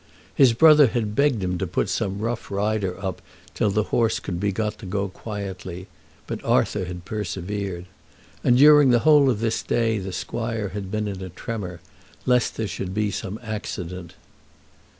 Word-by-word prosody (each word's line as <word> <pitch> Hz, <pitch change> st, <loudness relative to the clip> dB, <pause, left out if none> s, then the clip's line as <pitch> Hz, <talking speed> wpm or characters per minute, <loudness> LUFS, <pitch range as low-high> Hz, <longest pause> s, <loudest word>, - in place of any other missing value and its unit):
His 130 Hz, -4 st, +5 dB
brother 150 Hz, +2 st, +7 dB
had 110 Hz, -2 st, -2 dB
begged 135 Hz, -7 st, +2 dB
him 90 Hz, -1 st, -1 dB
to 95 Hz, -, -1 dB
put 90 Hz, -, -1 dB
some 100 Hz, -2 st, -2 dB
rough 115 Hz, +1 st, -3 dB
rider 100 Hz, -2 st, -1 dB
up 95 Hz, -2 st, -4 dB, 0.3 s
till -, -, +1 dB
the 105 Hz, +2 st, +1 dB
horse 115 Hz, -2 st, +2 dB
could 85 Hz, -3 st, -4 dB
be 100 Hz, +1 st, 0 dB
got 105 Hz, +1 st, -3 dB
to 105 Hz, -, -9 dB
go 100 Hz, +1 st, -2 dB
quietly, 95 Hz, -3 st, -7 dB, 0.4 s
but -, -, -5 dB
Arthur 100 Hz, -3 st, +1 dB
had 90 Hz, 0 st, -7 dB
persevered. 95 Hz, -2 st, -4 dB, 0.6 s
And 125 Hz, -, +4 dB
during 145 Hz, 0 st, +7 dB
the 120 Hz, -2 st, +4 dB
whole 150 Hz, -3 st, +6 dB
of 115 Hz, -4 st, 0 dB
this 115 Hz, -1 st, 0 dB
day 115 Hz, -2 st, 0 dB
the 95 Hz, 0 st, -5 dB
squire 110 Hz, +3 st, -3 dB
had 100 Hz, -1 st, -6 dB
been 105 Hz, +1 st, -2 dB
in 95 Hz, -2 st, -5 dB
a 95 Hz, -, -6 dB
tremor, 90 Hz, -1 st, -6 dB, 0.4 s
lest 125 Hz, -2 st, +2 dB
there 110 Hz, -, -1 dB
should 95 Hz, -1 st, -5 dB
be 105 Hz, -1 st, 0 dB
some 100 Hz, +2 st, -5 dB
accident. 90 Hz, -5 st, -6 dB
105 Hz, 175 wpm, -24 LUFS, 95-115 Hz, 0.6 s, brother